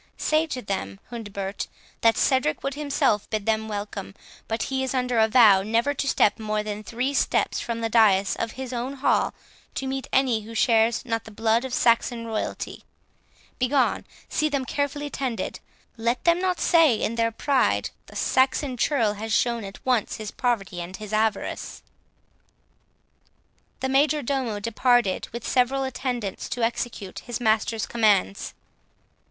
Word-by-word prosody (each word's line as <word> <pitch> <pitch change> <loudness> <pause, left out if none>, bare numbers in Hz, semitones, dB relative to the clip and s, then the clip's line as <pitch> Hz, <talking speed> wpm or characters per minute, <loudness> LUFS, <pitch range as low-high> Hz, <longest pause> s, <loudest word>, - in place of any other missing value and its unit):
Say 310 +1 +1
to 255 -5 -5
them, 100 - -4
Hundebert, 205 -4 -5 0.3
that 230 -1 +4
Cedric 260 - +1
would 275 - -1
himself 280 -8 0
bid 215 -2 -2
them 220 0 0
welcome, 205 -2 -5 0.3
but 225 +1 -1
he 265 -1 -2
is 265 0 -2
under 250 -2 +1
a 220 - +5
vow 215 -5 +6
never 230 +7 +1
to 275 - -3
step 210 -4 +3
more 215 -1 -1
than 210 0 -5
three 245 +6 -2
steps - - +1
from 230 -1 -3
the 225 - 0
dais 205 -4 +4
of 230 -1 -3
his 260 -1 -6
own 245 +3 -3
hall 275 - +1 0.4
to 270 - -3
meet 265 0 -3
any 255 -4 +2
who 225 +2 -10
shares 225 +1 +3
not 225 -2 -2
the - - -9
blood 225 +2 +1
of 260 - -5
Saxon 235 0 +2
royalty. 220 -1 -4 0.8
Begone! 255 +1 +1 0.2
see 305 - 0
them 280 -3 -1
carefully 290 +2 -2
tended; 245 -7 -3 0.4
let 235 +2 -1
them 340 0 +4
not 365 -1 0
say 325 -8 +5
in 215 - -1
their 230 0 +1
pride, 270 +3 +1 0.2
the - - -14
Saxon 260 0 +1
churl 230 -5 +2
has 220 +2 -6
shown 235 +1 +1
at 195 0 -10
once 250 -5 +1
his 215 -1 -6
poverty 200 -8 -1
and 180 +2 -7
his 215 -1 -8
avarice." 220 0 -1 2.0
The 265 - -1
major 290 +2 +3
domo 245 -5 -1
departed 230 -1 +2
with 235 0 -6
several 265 +2 +2
attendants, 250 -6 -3
to 245 - -2
execute 230 -4 -3
his 240 -1 -5
master's 220 -1 +1
commands. 205 - +1
230 Hz, 160 wpm, -25 LUFS, 215-265 Hz, 2.0 s, vow